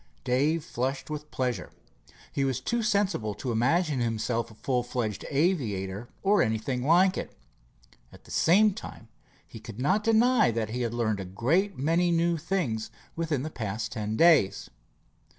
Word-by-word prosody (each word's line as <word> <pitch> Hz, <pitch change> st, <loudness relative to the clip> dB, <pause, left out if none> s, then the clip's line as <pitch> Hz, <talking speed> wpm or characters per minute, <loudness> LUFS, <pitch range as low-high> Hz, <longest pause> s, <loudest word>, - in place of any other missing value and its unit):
Dave 145 Hz, +6 st, +1 dB
flushed 135 Hz, +4 st, -3 dB
with 150 Hz, 0 st, -6 dB
pleasure. 125 Hz, -2 st, -2 dB, 0.6 s
He 140 Hz, -, -1 dB
was 130 Hz, -2 st, 0 dB
too 235 Hz, -, -1 dB
sensible 200 Hz, -, 0 dB
to 130 Hz, -, -4 dB
imagine 140 Hz, +6 st, +1 dB
himself 115 Hz, 0 st, -1 dB
a 110 Hz, -, -15 dB
full 125 Hz, +2 st, -1 dB
fledged 120 Hz, -4 st, -3 dB
aviator, 120 Hz, -, -1 dB
or 200 Hz, +1 st, +4 dB
anything 110 Hz, +3 st, -1 dB
like 180 Hz, +6 st, +4 dB
it. -, -, -8 dB, 0.7 s
At -, -, -16 dB
the -, -, -15 dB
same 205 Hz, +5 st, +4 dB
time, 115 Hz, -, -10 dB, 0.4 s
he 115 Hz, -, -11 dB
could 110 Hz, +1 st, -10 dB
not 185 Hz, +11 st, +1 dB
deny 225 Hz, -, +4 dB
that 115 Hz, -1 st, -2 dB
he 125 Hz, +2 st, -3 dB
had 120 Hz, -1 st, -2 dB
learned 110 Hz, -4 st, 0 dB
a 95 Hz, -, -5 dB
great 160 Hz, -, 0 dB
many 165 Hz, +6 st, +2 dB
new 170 Hz, 0 st, +2 dB
things 145 Hz, -, -2 dB, 0.3 s
within 160 Hz, -5 st, -1 dB
the 155 Hz, -, -5 dB
past 110 Hz, -3 st, -4 dB
ten 110 Hz, -1 st, -3 dB
days. 165 Hz, -, +4 dB
130 Hz, 160 wpm, -27 LUFS, 115-170 Hz, 0.7 s, or